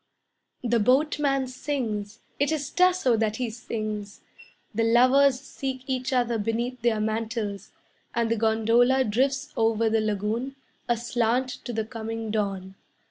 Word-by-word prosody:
The 235 -1 +2
boatman 275 +3 +2
sings, 235 -5 -4 0.2
It 285 +2 +2
is 290 -3 -2
Tasso 365 -9 +3
that 220 -1 0
he 240 -1 -2
sings; 215 -3 -5 0.5
The 225 +2 +1
lovers 255 +3 +5
seek 265 -1 -5
each 260 -1 -2
other 240 -3 +1
beneath 235 +3 -2
their 230 -2 +2
mantles, 220 -2 -3 0.4
And 230 -1 +1
the - - +3
gondola 230 +4 +3
drifts 260 +5 0
over 225 0 +2
the 225 0 +2
lagoon, 215 +5 -2 0.3
aslant 240 +1 +1 0.2
to - - -3
the 220 -2 -2
coming 225 -1 -5
dawn. 195 -3 -2
230 Hz, 135 wpm, -26 LUFS, 220-260 Hz, 0.5 s, lovers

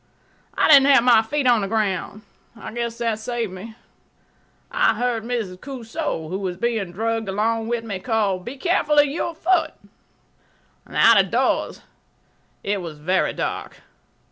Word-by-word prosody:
I - - +3
didn't 280 -3 +7
have 270 -4 +6
my 240 -3 +6
feet 275 +5 -2
on 240 -3 +4
the 195 - -2
ground. 210 -1 -2 0.4
I 220 - -8
guess 235 -1 -3
that 230 -2 -1
saved 230 -3 -3
me. 220 +4 -9 1.0
I - - +2
heard 240 -2 -1
Mrs. 225 -6 -4
Cosu, 255 - -5
who 185 +4 -4
was 185 -3 -4
being 225 -4 -2
dragged 225 +2 -2
along 220 +3 -1
with 235 -1 -2
me, 200 -4 -5
call, 205 -3 0
"Be 240 +9 -8
careful 300 -2 +1
of 290 - +7
your 320 +3 -3
foot." 345 +1 +1 1.1
Out - - +5
of - - -9
doors - - 0 0.8
it 200 -1 -1
was 165 -3 -8
very 180 +5 0
dark. - - -4
225 Hz, 155 wpm, -22 LUFS, 195-245 Hz, 1.1 s, didn't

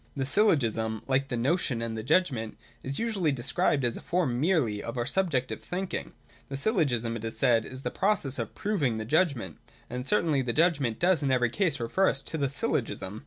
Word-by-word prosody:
The 135 -2 -1
Syllogism, 115 - +2
like 135 0 +1
the 125 - -3
notion 130 -1 0
and 115 -1 -3
the 110 - -3
judgment, 125 -5 0 0.2
is 135 +1 -3
usually 205 -9 0
described 135 +1 0
as 120 - 0
a - - -9
form 165 -9 0
merely 145 - +1
of 115 +2 -6
our 120 - 0
subjective 145 -5 -1
thinking. 185 +1 -4 0.4
The 135 - -3
Syllogism, 135 - +1
it 110 - -9
is 115 0 -4
said, 115 0 +3
is 130 +1 -9
the - - -2
process 190 -9 +1
of - - -4
proving 150 - 0
the 110 - -4
judgment. 140 - 0 0.3
And 125 +2 -4
certainly 160 -9 +2
the 120 -2 -2
judgment 145 -8 +2
does 175 -3 +3
in 140 - 0
every 125 -3 +2
case 180 0 0
refer 155 +12 +2
us 135 - -3
to 160 - -5
the 140 -2 +1
Syllogism. 110 -6 -2
135 Hz, 200 wpm, -28 LUFS, 115-170 Hz, 0.4 s, said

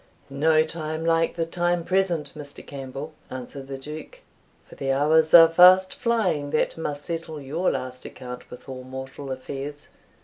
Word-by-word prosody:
"No 155 +3 +3
time 160 0 -4
like 165 0 +2
the 165 -1 -1
time 175 0 0
present, 175 -5 0
Mr. 145 -2 -9
Campbell," 140 +2 -7 0.2
answered 130 +2 -7
the 135 0 -5
Duke, 155 - -9 0.4
"for - - -16
the 135 -1 -2
hours 155 +3 +3
are 165 -1 +11
fast 180 +3 +7
flying 200 - 0
that 155 +1 0
must 145 -3 -4
settle 165 -2 -4
your 150 +6 -1
last 130 0 -4
account 125 -1 -9
with 125 - -12
all 130 -1 -7
mortal 130 +1 -7
affairs. 140 +3 -6
155 Hz, 160 wpm, -25 LUFS, 135-165 Hz, 0.4 s, are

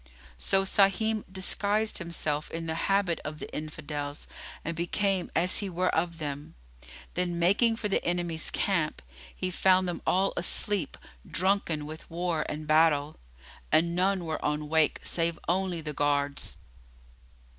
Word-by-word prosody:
So 195 - +2
Sahim 205 +3 +2
disguised 205 +3 +1
himself 155 -3 -2
in 165 0 -5
the 160 - -2 0.2
habit 195 -4 +2
of 150 +1 -5
the - - -8
Infidels 150 -1 -4 0.4
and 170 - -2
became 185 +2 0
as 180 +2 +3
he 200 - -3
were 180 +1 0
of 170 0 0
them; 145 - -5 0.6
then, 175 -1 -1
making 200 +7 +3
for 225 -1 -2
the 195 - 0
enemy's 175 -2 -2
camp, 170 -6 0 0.3
he 185 -1 -2
found 185 0 +4
them 175 - -3
all 190 +2 +3
asleep, 185 -1 0 0.3
drunken 180 -5 0
with 155 +1 -9
war 170 -2 -1
and 155 +1 -4
battle, 155 -1 +3 0.5
and 170 +2 +3
none 185 0 +1
were 160 -1 -3
on 150 0 -1
wake 160 -1 +3
save 165 -1 +2
only 180 -1 0
the 150 -1 -5
guards. 145 0 0
170 Hz, 145 wpm, -29 LUFS, 155-190 Hz, 0.6 s, found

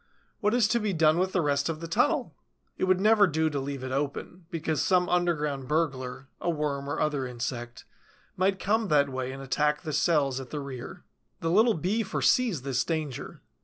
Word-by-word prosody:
What 210 +1 +1
is 240 -4 +4
to 235 +2 +2
be 210 -3 -1
done 160 0 +4
with 185 +1 +1
the 185 - +1
rest 140 +1 +1
of 160 -1 -3
the 165 - -6
tunnel? 165 - +1 0.4
It - - 0
would 185 0 +3
never 210 0 +5
do 160 -1 0
to 145 - -2
leave 135 -1 -5
it 130 - -4
open, 145 +5 -4
because 160 -4 -1
some 180 +1 +3
underground 150 -7 0
burglar, 135 -4 -2
a - - -1
worm 145 -3 -2
or 145 - -2
other 145 -4 0
insect, 120 0 -5 0.5
might 190 +1 +1
come 215 +3 +1
that 145 -3 +3
way 130 -1 -3
and 135 +1 -7
attack 150 +3 0
the 155 -3 -4
cells 140 -4 +2
at 130 -2 -8
the 150 - -4
rear. 135 -3 -8 0.4
The 165 - 0
little 220 +5 +4
Bee 185 +8 0
foresees 220 - +1
this 130 -2 0
danger. 155 -6 -4
155 Hz, 200 wpm, -28 LUFS, 140-180 Hz, 0.5 s, never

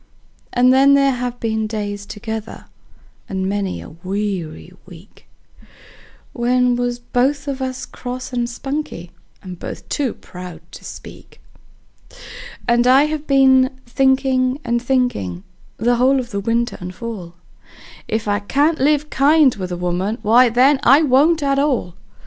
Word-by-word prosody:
And 250 +1 +4
there 275 +1 +5
has 245 -1 -3
been 220 -2 -2
days 205 -2 -5
together 220 +1 -7 0.6
and 190 -1 -2
many 200 -1 -2
a - - -11
weary 185 -1 -5
week 180 +2 -16 1.1
We 250 +1 +2
was 245 0 -1
both 270 +4 -1
of 275 -1 -3
us 260 -1 -4
cross 255 +1 -7
and 240 -1 -1
spunky, 270 - -5 0.3
and 180 -2 -9
both - - -8
too 275 -5 -1
proud 180 0 -10
to - - -12
speak; - - -12 1.3
And 240 +1 +3
I 265 +3 +6
have 305 0 -3
been 265 -1 +4
thinkin' 265 0 +1
and 235 0 0
thinkin', 240 - -1 0.3
the 240 +3 +1
whole 265 +2 +3
of 240 -2 -6
the 200 - -2
winter 230 +3 -1
and 180 0 -7
fall, 200 -7 -7 0.7
If 220 0 -2
I 205 0 +1
can't 290 +9 +1
live 300 +2 +1
kind 285 -1 +4
with 185 -2 -6
a 175 - -3
woman, 180 +5 -2
why, 240 +4 +5
then, 260 +4 +4
I 275 +6 +5
won't 300 +3 +3
at 275 0 +1
all. 260 - 0
245 Hz, 145 wpm, -19 LUFS, 205-270 Hz, 1.3 s, I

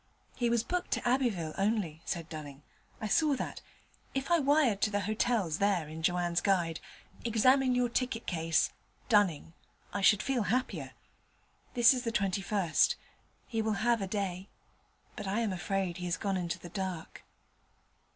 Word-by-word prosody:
'He 240 -2 +1
was 235 -1 +2
booked 360 +7 -2
to - - -2
Abbeville 230 - +1
only,' 195 -6 0
said 170 -3 -3
Dunning. 145 -3 -8 0.4
'I 215 - -2
saw 300 +5 +3
that. - - -5 0.5
If 270 +4 -2
I 340 - +5
wired 275 -8 +3
to - - +3
the 205 -1 0
hotels 215 -5 0
there 200 -6 +2
in 160 +1 -7
Joanne's 175 0 +1
Guide, 175 -5 +1 0.4
"Examine 255 +3 +3
your 245 0 +2
ticket 240 -1 -2
case, 165 -2 +1 0.4
Dunning," 190 - +2 0.4
I 200 - -1
should 205 +1 +5
feel 265 -3 0
happier. 255 +4 -1 0.8
This 240 +1 +7
is 255 - -2
the 230 - -1
21st: 195 -4 +1 0.5
he 225 -2 -2
will 220 0 0
have 235 -2 +3
a 195 - -2
day. 190 -1 -3 0.7
But - - -6
I 205 +4 0
am 215 -4 0
afraid 185 -1 -2
he 180 - -5
has 175 -1 -1
gone 200 0 -1
into 175 -1 -2
the 175 -1 -10
dark.' 185 -3 -5
200 Hz, 160 wpm, -31 LUFS, 175-235 Hz, 0.8 s, This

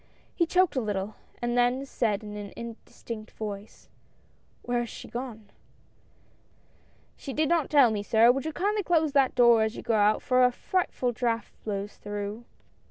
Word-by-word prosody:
He 340 - +1
choked 365 -1 +3
a 260 - +1
little, 205 -1 -3 0.3
and 240 0 0
then 245 +2 +2
said 220 -5 -1
in 210 0 -7
an 205 -1 -7
indistinct 230 -1 -8
voice: 210 -1 -7 0.4
" - - -37
Where 245 0 0
has 240 -1 -3
she - - -9
gone? 235 -4 -7 0.8
" - - -36
"She 275 - -6
did 310 +2 +1
not 335 -2 +1
tell 275 -6 +6
me, 210 -2 -1
sir. 225 +3 +5
Would 270 +2 -3
you 315 - -2
kindly 410 +6 0
close 320 -5 +2
that 275 -2 +3
door 235 -2 +6
as 220 +1 0
you - - -7
go 235 - 0
out, 210 0 +3
for 255 0 +3
a 250 - +5
frightful 260 -4 -1
draught 235 -1 -2
blows 205 -1 -4
through." 205 +2 -5
240 Hz, 180 wpm, -27 LUFS, 215-270 Hz, 0.8 s, tell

